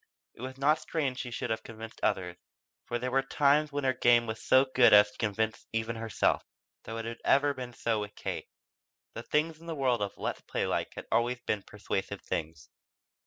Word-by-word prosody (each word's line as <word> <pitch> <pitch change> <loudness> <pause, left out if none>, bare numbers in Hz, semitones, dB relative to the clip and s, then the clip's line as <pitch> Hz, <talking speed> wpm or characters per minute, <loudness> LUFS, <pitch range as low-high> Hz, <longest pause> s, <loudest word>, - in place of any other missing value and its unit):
It - - -14
was 130 +1 -6
not 150 +3 +3
strange 140 -5 -2
she 125 - -4
should 120 0 -3
have 110 - -1
convinced 115 0 -10
others, 90 -2 0 0.5
for 120 - -1
there 125 +1 -3
were 135 +1 +3
times 145 +2 +2
when 145 0 -2
her 130 -1 +3
game 120 -2 +4
was 110 -1 -5
so 130 +1 +5
good 125 -4 +7
as 105 0 +8
to - - -19
convince 110 +1 -1
even 115 0 -1
herself. 115 -2 +1 0.4
Though 115 - -5
it 115 - -4
had 115 0 -6
ever 140 +1 +4
been 125 -2 -7
so 115 -2 0
with 105 0 -6
Kate. - - -5 0.6
The 115 - -5
things 155 +5 0
in 165 - -13
the 165 - -3
world 130 -5 +1
of 100 -1 -3
"Let's - - -3
play - - -2
like" - - -2
had - - -7
always 120 +1 +2
been 105 - -1
persuasive 100 -1 -4
things. 80 -4 -4
120 Hz, 210 wpm, -30 LUFS, 110-135 Hz, 0.6 s, as